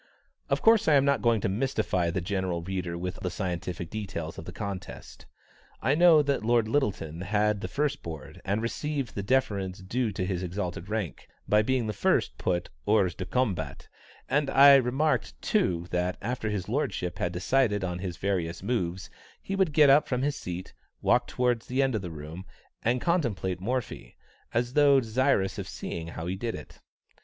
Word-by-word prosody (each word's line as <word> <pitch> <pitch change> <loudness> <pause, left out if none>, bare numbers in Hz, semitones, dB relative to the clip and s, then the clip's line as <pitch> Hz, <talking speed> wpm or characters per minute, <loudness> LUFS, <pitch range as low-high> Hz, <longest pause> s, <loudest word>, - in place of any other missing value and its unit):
Of - - 0
course 225 -1 +5
I 155 - +6
am 140 -1 +5
not 140 0 +2
going 115 -3 +3
to - - 0
mystify 100 -5 0
the 85 +2 -1
general 90 -2 -2
reader 90 -2 -3
with 90 +1 -4
the 90 - -2
scientific 85 -2 -4
details 90 -7 -5
of 80 - -9
the 90 - -6
contest. 100 -1 -7 0.5
I 130 - +2
know 160 -1 +6
that 140 -5 0
Lord 115 -1 +3
Lyttelton 95 - -1
had 105 +2 +1
the - - -3
first 145 0 -1
board, 80 -5 -8
and 105 +4 -1
received 140 +1 -3
the 100 - -3
deference 100 -5 0
due 110 +4 -2
to 95 - -2
his 90 -2 -2
exalted 90 -1 -4
rank, 105 -6 -3 0.2
by 105 0 +4
being 130 +1 0
the 105 - -2
first - - +1
put 90 -1 0 0.2
hors 100 -5 +3
du 90 - -5
combat, 125 -8 -1 0.4
and 145 0 +1
I 140 +1 +8
remarked, 130 - 0
too, 85 +4 +1
that 90 0 0
after 115 -1 -3
his 100 -4 -3
lordship 105 -8 -2
had 90 -5 0
decided 105 +3 +1
on 90 -1 -2
his 90 -2 -5
various 90 -3 -2
moves, 95 -5 -2 0.3
he 195 - -4
would 190 -4 +2
get 145 -2 +6
up 145 +2 +5
from 125 0 -1
his 145 0 0
seat, 90 +1 -6 0.3
walk - - +3
towards 125 -2 0
the 130 +2 +1
end 135 -1 +1
of 110 - -1
the 90 - -5
room, 80 +3 -8 0.4
and 120 +3 +1
contemplate 105 - 0
Morphy, 120 - -3 0.4
as 120 +2 0
though 145 -1 +6
desirous 115 -4 +1
of - - -5
seeing 80 -1 -5
how 85 0 -6
he 90 +2 -2
did 115 +3 -3
it. 75 - -11
105 Hz, 185 wpm, -28 LUFS, 90-130 Hz, 0.5 s, I